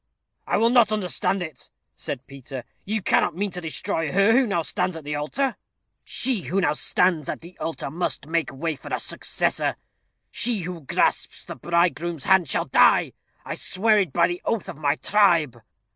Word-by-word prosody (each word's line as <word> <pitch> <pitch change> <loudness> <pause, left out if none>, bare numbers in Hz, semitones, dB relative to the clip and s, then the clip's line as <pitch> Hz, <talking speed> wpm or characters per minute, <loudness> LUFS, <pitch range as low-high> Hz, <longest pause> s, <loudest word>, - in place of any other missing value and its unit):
"I - - +2
will 230 +1 +3
not 240 -4 +5
understand 195 -2 0
it," 160 -6 -8 0.2
said 130 -1 -5
Peter. 135 -2 -8 0.2
"You 215 0 -2
cannot - - +2
mean 200 +2 -1
to 180 0 -4
destroy 165 -1 -2
her 195 +3 +4
who 250 +2 +4
now 175 -5 0
stands 180 +2 -1
at 160 - -7
the 150 +1 -4
altar?" 240 - -1 0.5
"She 250 -7 -1
who 195 - 0
now 185 - +2
stands 165 0 +1
at - - -4
the 170 +2 -12
altar 165 -4 -4
must 170 -2 -2
make 165 +1 -1
way 155 +4 -3
for - - -11
a - - 0
successor. - - -1 0.6
She 230 -4 0
who 175 -1 -6
grasps 135 - 0
the - - -6
bridegroom's 170 -2 0
hand 190 -6 +4
shall - - 0
die. - - +4 0.3
I - - -4
swear 215 +2 +2
it 190 -4 0
by 170 -1 +3
the 175 0 -4
oath 225 -4 -1
of - - -6
my 145 -1 +1
tribe." 170 - +2
175 Hz, 185 wpm, -24 LUFS, 155-200 Hz, 0.6 s, not